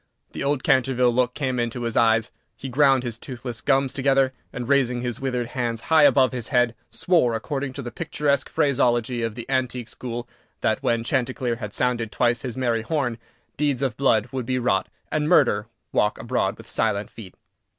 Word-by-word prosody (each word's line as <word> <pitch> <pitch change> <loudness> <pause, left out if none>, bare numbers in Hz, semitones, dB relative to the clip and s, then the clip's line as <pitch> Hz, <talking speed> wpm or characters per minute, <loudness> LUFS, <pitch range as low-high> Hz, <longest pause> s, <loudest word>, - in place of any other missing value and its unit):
The - - -5
old 140 -1 0
Canterville 125 -2 +3
look 125 0 +1
came 130 -4 -1
into 120 +1 -2
his 115 -1 -2
eyes; 115 0 +3 0.3
he 135 - -6
ground 135 0 +4
his 120 -2 -4
toothless 120 -2 -7
gums 135 -2 +2
together; 135 -1 +2 0.2
and, 125 -1 -5
raising 125 -3 +2
his 120 -1 -4
withered 125 -3 -2
hands 120 -2 -2
high 155 -2 +7
above 130 -3 +5
his 125 -3 -3
head, 120 -2 +2 0.2
swore 160 -11 +2
according 135 +3 -3
to 140 - -6
the 120 - -6
picturesque 150 -3 -1
phraseology 120 -3 +1
of 115 -2 -2
the 120 -1 -6
antique 125 -3 -1
school, 120 -1 -6 0.3
that, - - +1
when 115 -1 +1
Chanticleer 125 -1 -1
had 105 -3 -6
sounded 120 -3 0
twice 120 +2 +1
his 125 -1 -5
merry 120 -3 +1
horn, 120 -2 -2 0.4
deeds 140 -3 0
of 130 -5 -1
blood 110 -5 +2
would 130 -3 -4
be 130 - 0
wrought, 120 -6 +1 0.2
and 150 0 0
murder 120 - +4 0.2
walk 105 0 +1
abroad - - -1
with - - -13
silent 100 +1 -1
feet. 100 -6 -11
125 Hz, 185 wpm, -24 LUFS, 115-135 Hz, 0.4 s, high